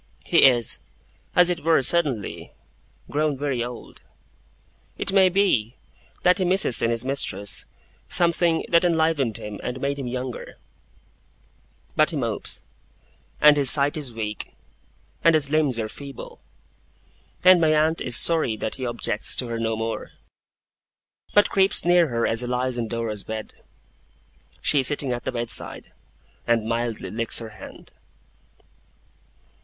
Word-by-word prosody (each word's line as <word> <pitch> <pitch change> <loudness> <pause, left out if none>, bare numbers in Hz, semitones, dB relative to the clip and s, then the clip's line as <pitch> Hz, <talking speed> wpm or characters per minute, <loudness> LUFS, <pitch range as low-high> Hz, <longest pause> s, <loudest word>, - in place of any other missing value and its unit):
He - - +5
is, 120 -4 +2 0.6
as 180 0 +5
it 170 -3 -4
were 160 -4 +3
suddenly, 140 - -1 0.6
grown 150 -1 0
very 135 -4 -2
old. 120 -1 -9 1.0
It - - -1
may 190 -1 +5
be 175 - +1 0.5
that 180 +2 +3
he - - +1
misses 180 - +3
in 115 - +1
his 115 +1 -3
mistress, 100 -7 -2 0.4
something 170 -1 +1
that 170 0 +3
enlivened 160 - +1
him 105 -1 -8
and 125 +1 -5
made 140 +1 -2
him 135 - -5
younger; 125 0 -6 1.4
but 155 +1 +3
he 165 - -2
mopes, 115 -6 -2 0.8
and 150 0 +7
his 140 -3 +5
sight 145 0 +5
is 145 -5 -5
weak, 110 -2 -6 0.7
and 165 -1 +5
his 145 -2 0
limbs 150 -6 +1
are 110 -1 -2
feeble, 140 +3 -10 1.0
and 185 -1 +6
my 160 -1 +3
aunt 160 +2 +1
is 120 - +2
sorry 160 -10 +2
that 110 - -4
he 130 - -5
objects 115 -2 -2
to 125 - -2
her 115 0 -4
no 115 -1 -1
more, 115 0 -5 1.2
but 205 - +4
creeps 195 -2 +2
near 175 -1 +4
her 115 -3 -1
as 115 +1 -1
he 125 - -4
lies 125 +1 -1
on 120 -2 -3
Dora's 110 -3 -4
bed 110 -1 -7 1.1
she 145 - +3
sitting 135 -1 0
at 120 - -6
the - - -2
bedside 120 -2 0 0.6
and 115 -2 +1
mildly 115 -1 -3
licks 115 +1 0
her 115 -1 -3
hand. 105 -3 -13
130 Hz, 145 wpm, -23 LUFS, 115-160 Hz, 1.4 s, and